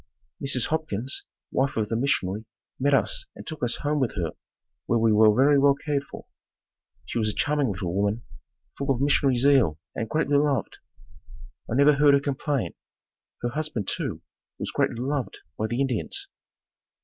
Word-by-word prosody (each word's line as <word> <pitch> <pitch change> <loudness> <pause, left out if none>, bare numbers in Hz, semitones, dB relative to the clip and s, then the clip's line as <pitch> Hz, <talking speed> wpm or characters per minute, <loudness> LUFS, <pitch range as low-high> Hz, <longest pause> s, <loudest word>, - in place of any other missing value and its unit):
Mrs. 130 -3 0
Hopkins, 140 -6 -2 0.3
wife 135 -1 0
of 105 -1 0
the 115 - -1
missionary, 110 -5 0 0.3
met 140 +2 +2
us - - 0
and - - -10
took 155 -3 -7
us 120 - 0
home 150 0 +1
with 130 -6 0
her 85 -5 -2 0.6
where 115 - +2
we 110 -1 +3
were 110 0 +6
very 140 +2 +5
well 140 0 +5
cared 140 -1 -2
for. - - -10 0.8
She - - -3
was 110 -1 +1
a - - -3
charming 145 -5 +1
little 90 -3 -3
woman, 100 +4 0 0.5
full 140 0 -4
of 130 -3 +2
missionary 140 -2 +3
zeal 125 - +4 0.2
and 110 - -4
greatly 145 +1 +2
loved. 140 -5 0 0.9
I - - 0
never 140 +2 +6
heard 145 0 +6
her - - +4
complain. 140 -1 -2 0.7
Her 120 - +1
husband, 150 -7 -3
too, - - -3 0.3
was - - -4
greatly - - 0
beloved 130 +2 -2 0.2
by 110 - -1
the 120 +3 -2
Indians. 130 -5 -1
135 Hz, 170 wpm, -26 LUFS, 110-145 Hz, 0.9 s, were